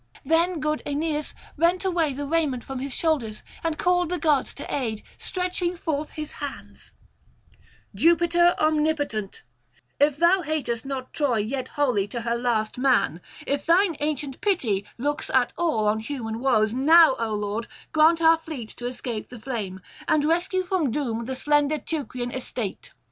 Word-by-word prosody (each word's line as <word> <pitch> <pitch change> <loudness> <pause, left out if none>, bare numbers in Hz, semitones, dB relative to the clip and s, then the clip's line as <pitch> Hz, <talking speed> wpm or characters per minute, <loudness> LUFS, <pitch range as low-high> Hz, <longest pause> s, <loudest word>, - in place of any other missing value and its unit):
Then 330 +3 +2
good 305 0 -1
Aeneas 300 +1 -2 0.2
rent 345 +4 +2
away 340 -5 +1
the 285 +2 -4
raiment 285 -5 0
from 270 -1 -5
his 275 +1 -4
shoulders 255 -8 -1 0.2
and 325 -2 -1
called 355 -1 +2
the 360 - -1
gods 300 -5 +2
to 285 - -5
aid, 225 -6 -2 0.2
stretching 360 -1 -2
forth 305 -3 -2
his 305 -1 -6
hands: 285 -1 -7 1.0
'Jupiter 345 +1 +4
omnipotent, 300 - 0 0.6
if 290 0 +3
thou 345 +4 +4
hatest 275 -8 -2
not 265 -2 -5
Troy 280 -6 +1
yet 250 +5 -2
wholly 250 -10 +1
to 235 +3 -5
her 235 0 -1
last 235 -2 -1
man, 245 - +2 0.2
if 280 +1 -1
thine 345 +1 +3
ancient 295 -2 -3
pity 230 - 0
looks 290 +4 -2
at 255 -2 +3
all 310 -12 +1
on 215 +1 +2
human 225 -2 -4
woes, 225 -4 +2
now, 310 +3 +6
O 225 -2 -1
Lord, 210 +3 -3 0.2
grant 325 +2 +4
our 325 0 +6
fleet 300 -9 -7
to 245 - -4
escape 245 -3 -4
the 245 - -10
flame, 215 -6 -4 0.3
and 300 -1 +3
rescue 350 +4 +1
from 360 -6 0
doom 235 -3 -2
the 260 +2 -3
slender 295 +2 +2
Teucrian 255 -6 -4
estate. 245 -5 -5
285 Hz, 160 wpm, -25 LUFS, 240-325 Hz, 1.0 s, now